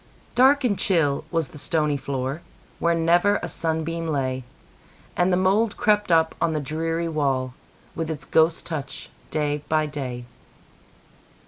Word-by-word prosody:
Dark 270 +3 +5
and 205 -6 +1
chill 160 -7 +1
was 165 -5 -1
the 150 - -11
stony 150 -1 0
floor, 135 +2 -3 0.4
Where 170 0 +2
never 175 +5 +3
a - - -2
sunbeam 165 0 -2
lay, 130 -4 -1 0.7
And 180 +1 +2
the 180 - +3
mould 200 +4 +2
crept 210 -3 +2
up 160 -1 +4
on 165 -1 +2
the 155 - 0
dreary 165 +3 -2
wall, 135 -5 0 0.4
With 165 -1 -3
its 160 - -5
ghost 160 +1 +2
touch, 140 -5 -6 0.2
day 150 -1 -1
by 155 0 +2
day. 130 -5 -5
160 Hz, 145 wpm, -24 LUFS, 145-170 Hz, 0.7 s, Dark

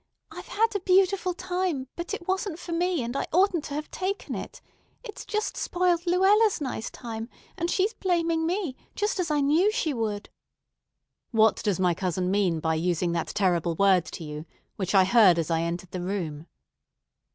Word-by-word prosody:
I've - - -9
had 450 +2 +2
a - - +1
beautiful 370 0 +2
time; 360 -7 -2
but 345 0 -5
it 395 -4 -5
wasn't 380 -2 -1
for 350 - -8
me, 345 -3 0
and 235 +3 -4
I - - -1
oughtn't 360 -2 +2
to 285 - -5
have 300 +1 -5
taken 385 +2 -3
it. - - -6 0.4
It's 435 - -8
just 425 0 -2
spoiled 355 -1 0
Luella's 390 +4 +4
nice 255 -6 -4
time, 225 -1 -7 0.3
and 340 +1 -2
she's 395 +5 +1
blaming 335 -3 0
me, 350 -6 -2 0.2
just 415 -1 -1
as 350 -3 0
I 295 -1 +2
knew 320 +9 +3
she 430 -10 -1
would." 215 -4 -3 1.0
"What 220 -2 +3
does 205 -5 0
my 180 -2 +3
cousin 180 +1 -1
mean 190 -5 +1
by 160 0 0
using 170 +1 0
that 170 -1 -1
terrible 175 -4 0
word 190 -2 +4
to 165 - -8
you, 150 +1 -7 0.3
which 190 0 -2
I 190 - +7
heard 190 -3 +6
as 165 0 -1
I 165 0 +2
entered 170 +2 -4
the 180 - -4
room?" 170 -5 -4
280 Hz, 185 wpm, -26 LUFS, -, 1.0 s, I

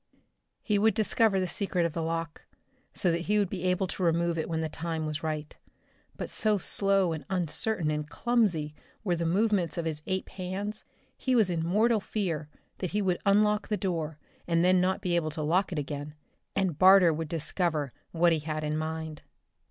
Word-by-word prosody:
He 210 -2 +1
would 220 +2 +3
discover 220 -2 +2
the 185 - 0
secret 180 -2 -1
of 165 - -2
the 165 - -2
lock, 165 -1 -3 0.5
so 180 - +3
that 170 +1 -2
he 210 - +4
would 200 -3 +1
be 185 - -4
able 180 +1 +2
to 185 - -6
remove 170 0 +2
it 160 0 -3
when 160 -1 -1
the 160 - -1
time 160 0 -4
was 155 -1 -3
right 155 -1 -4 0.6
but - - -5
so 215 -1 +2
slow 195 -2 +2
and 155 -2 -5
uncertain 180 0 0
and 150 0 -3
clumsy 175 -5 +1 0.3
were 180 -5 +1
the 170 0 -1
movements 190 -2 +1
of 170 - -2
his 155 -2 -2
ape 190 -1 -2
hands, 195 +3 -5 0.3
he 260 -1 0
was 215 -6 +3
in 165 -2 -1
mortal 215 +6 +3
fear 180 -7 -3 0.3
that 185 - -2
he 210 - +1
would 180 -2 +1
unlock 210 +1 +3
the 210 - 0
door 165 -6 -2 0.3
and 170 0 +2
then 185 0 +5
not 190 +2 +1
be 180 -3 0
able 165 -2 +1
to 155 0 -4
lock 180 +6 +1
it 170 - -3
again, 145 +1 -4 0.4
and 185 -6 0
Barter 185 -3 +7
would 160 +1 -3
discover 160 -3 -1 0.2
what 170 0 +3
he 160 - +1
had 155 0 -4
in 150 0 -1
mind. 160 -1 -4
175 Hz, 200 wpm, -29 LUFS, 160-195 Hz, 0.6 s, Barter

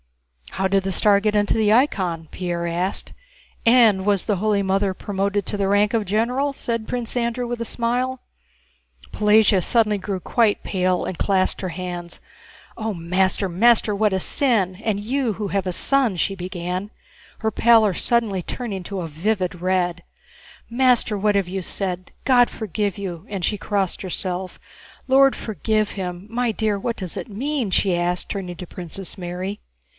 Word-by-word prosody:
"How 190 - 0
did 195 0 +1
the 195 - -2
star 200 +1 +4
get 210 0 0
into 205 -1 +2
the 215 -2 +2
icon?" 185 - +1
Pierre 175 -2 -3
asked. 175 +3 -2 0.5
"And 230 -5 +5
was 200 -2 +2
the 210 -3 0
Holy 210 +1 +1
Mother 195 0 +1
promoted 200 +1 -2
to - - -3
the 200 -1 0
rank 205 +2 +3
of 225 -2 +1
general?" 240 +8 0
said 230 -4 -3
Prince 245 -2 -2
Andrew, 240 0 -1
with 240 0 -4
a - - -2
smile. 250 +3 -1 0.9
Pelagéya 210 -2 +4
suddenly 215 -3 +3
grew 195 0 -3
quite 225 +2 +1
pale 185 -2 0
and 185 - -4
clasped 190 -2 +1
her 185 - -3
hands. 175 0 -6 0.6
"Oh, 220 -1 -3
master, 185 +3 +1
master, 210 +3 +3
what 210 0 +2
a 190 - 0
sin! 205 -5 +1
And 215 -3 0
you 245 +2 -1
who 205 0 -4
have 195 -1 -1
a - - 0
son!" 250 0 +2
she 195 +3 0
began, 180 +1 -4 0.5
her 220 - 0
pallor 220 -2 +4
suddenly 215 -1 0
turning 200 -1 -5
to 195 +1 -5
a 165 - -4
vivid 180 +2 -2
red. 180 -1 0 0.7
"Master, 245 -3 +3
what 205 +1 +1
have 195 -3 +1
you 190 +1 -3
said? 185 0 -4
God 245 -2 +5
forgive 210 -2 -3
you!" 180 -5 -6
And 195 -4 -2
she 210 - 0
crossed 200 -3 -1
herself. 185 0 -4 0.5
"Lord 270 +1 +5
forgive 215 +1 -1
him! 180 -1 -5
My 240 +1 0
dear, 215 -1 0
what 230 +4 -3
does 185 -4 -3
it - - -5
mean?..." 255 +2 -2
she 185 0 +2
asked, 175 +1 -1
turning 180 -4 -5
to 180 - -8
Princess 180 +3 -6
Mary. 180 +2 -5
200 Hz, 170 wpm, -22 LUFS, 185-225 Hz, 0.9 s, And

